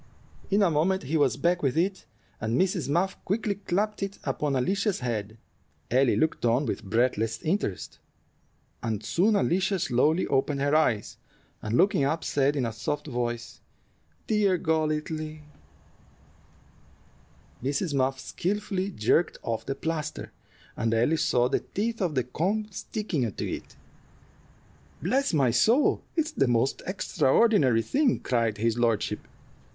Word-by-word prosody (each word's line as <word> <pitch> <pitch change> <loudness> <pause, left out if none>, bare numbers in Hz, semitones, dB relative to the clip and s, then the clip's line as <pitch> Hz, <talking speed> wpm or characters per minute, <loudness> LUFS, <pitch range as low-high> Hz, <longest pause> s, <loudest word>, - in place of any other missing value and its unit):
In 200 +1 +3
a 180 - +3
moment 175 +5 +1
he 140 +5 -2
was 140 -7 +2
back 175 +1 +1
with 135 +1 0
it, 190 +3 0 0.3
and 110 +3 0
Mrs. 185 -5 0
Muff 180 +6 0
quickly 205 +1 0
clapped 205 +2 -2
it 195 0 -3
upon 145 -2 -1
Alicia's 195 - 0
head. 110 -3 -3 0.5
Ellie 130 0 +4
looked 160 +1 0
on 120 +4 +2
with - - -3
breathless 115 +1 0
interest, 160 - -2 0.8
and 110 -2 -3
soon 200 - +2
Alicia 190 0 +1
slowly 155 +3 +2
opened 140 +1 0
her 145 +2 +2
eyes, 125 -9 +1 0.4
and 110 +3 -1
looking 195 -6 +3
up, 155 +4 0
said, 140 +1 +1
in 135 -4 0
a 115 - -3
soft 145 +6 -3
voice, 120 -4 -4 0.6
"Dear 205 -4 +2
Golightly!" 155 -1 -2 2.2
Mrs. 145 +4 -1
Muff 130 -1 +1
skillfully 195 +4 -2
jerked 165 - +1
off 115 -1 -3
the 135 - -2
plaster, 155 0 -4 0.4
and 115 0 0
Ellie 120 +8 +2
saw 125 -5 +2
the - - +1
teeth 225 +2 -3
of 170 -5 0
the 130 - +2
comb 190 - -1
sticking 165 - -3
to - - -4
it. - - -6 1.2
"Bless 275 +2 +1
my 135 -7 +3
soul! 225 - +3
it's 320 -2 0
the 135 - +1
most 120 +2 +1
extraordinary 180 - +3
thing," 275 - +1
cried 115 -4 0
his 115 +2 0
lordship. 115 -3 0
150 Hz, 140 wpm, -27 LUFS, 125-190 Hz, 2.2 s, Ellie